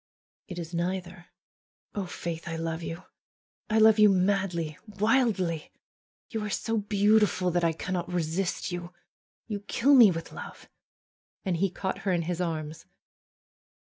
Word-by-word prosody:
FAITH 180 -3 -7
is 170 0 -6
neither. 175 +1 -3 0.7
Oh, 200 -3 -3
Faith, 170 -2 -5
I 165 - -3
love 165 0 -3
you! 165 +2 -6 0.7
I 220 - +2
love 220 0 +6
you 210 -1 +8
madly, 185 -5 0
wildly! 205 -6 +1 0.6
You 220 -3 -2
are 210 - -3
so 225 +2 -1
beautiful 205 -2 +3
that 175 0 +1
I 165 -1 +3
cannot 180 +1 -3
rc'cist 180 +2 -1
you. 175 0 -5 0.5
You 210 -3 -4
kill 230 +7 +2
me 240 -6 +9
with 165 -2 -4
love." - - -9 0.8
And 180 -3 0
he 195 +3 +2
caught 190 +1 -4
her 195 - -1
in 175 -2 +1
his 175 +1 -2
arms. 155 -2 -4
180 Hz, 145 wpm, -28 LUFS, 170-205 Hz, 0.8 s, me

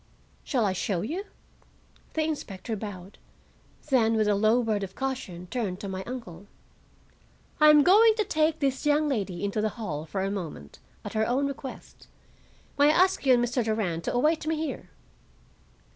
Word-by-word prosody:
"Shall 250 -7 0
I 190 - +1
show 185 -1 -1
you?" 340 - -4 0.9
The 315 - +1
inspector 230 -8 -4
bowed, 195 -2 -8 0.7
then 225 -4 +4
with 215 -1 +2
a 210 - +3
low 215 +4 +3
word 220 -4 0
of 195 -1 -6
caution 250 -10 -4
turned 195 -3 -3
to 200 - -5
my 190 0 -4
uncle. 205 -7 -8 1.1
"I 305 0 +7
am 300 -1 +7
going 430 +5 +6
to 430 - +1
take 315 -4 0
this 270 -1 0
young 300 +1 +3
lady 200 -10 -2
into 200 +1 -1
the 215 - +1
hall 160 -8 -4
for 190 +4 -2
a 195 - -1
moment, 160 - -7 0.3
at - - -6
her 220 0 +1
own 265 +4 +1
request. 275 -1 -8 0.7
May 285 - +6
I 300 - +5
ask 370 -5 +2
you 255 - +7
and 240 0 +2
Mr. 245 0 -1
Durand 205 -7 -1
to - - -1
await 310 +5 +1
me 320 - +1
here?" 285 - -5
225 Hz, 175 wpm, -27 LUFS, 195-290 Hz, 1.1 s, I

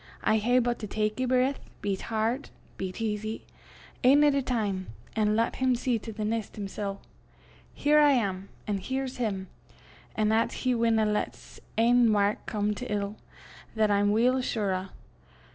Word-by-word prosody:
I 220 - +3
hae 245 +4 +2
but 240 -1 +1
to 215 - -5
tak 215 +3 -1
ae - - +2
breath, 255 +2 +2 0.2
be 200 -1 0
't - - -9
hard, 225 +5 -1 0.3
be 190 -1 -4
't 225 +5 -4
easy, 215 +1 -3 0.6
ane 280 +4 +6
at 295 -1 +5
a 280 - +2
time, 210 -7 -1 0.3
an' 215 -1 +2
lat 230 +1 0
him 260 -1 +2
see 240 -1 0
to 225 - -7
the 215 0 -4
neist 220 -1 -2
himsel'. 200 -1 -5 0.7
Here 300 +1 +3
I 295 -1 +6
am, 195 -6 -1 0.2
an' 205 -2 -1
here's 260 +5 -3
him; 200 -6 -2 0.7
an' 215 0 +2
'at 225 +1 +2
he 255 - +3
winna 230 -2 +2
lat 210 0 -1
's - - -15 0.2
ain 235 0 +5
wark 205 0 +1
come 210 -1 0
to 250 +3 -6
ill, 205 0 -2 0.6
that 215 -1 +3
I'm 205 0 +3
weel 250 +4 +3
sure 210 -6 -1
o'. 185 +1 -3
220 Hz, 180 wpm, -28 LUFS, 205-245 Hz, 0.7 s, ane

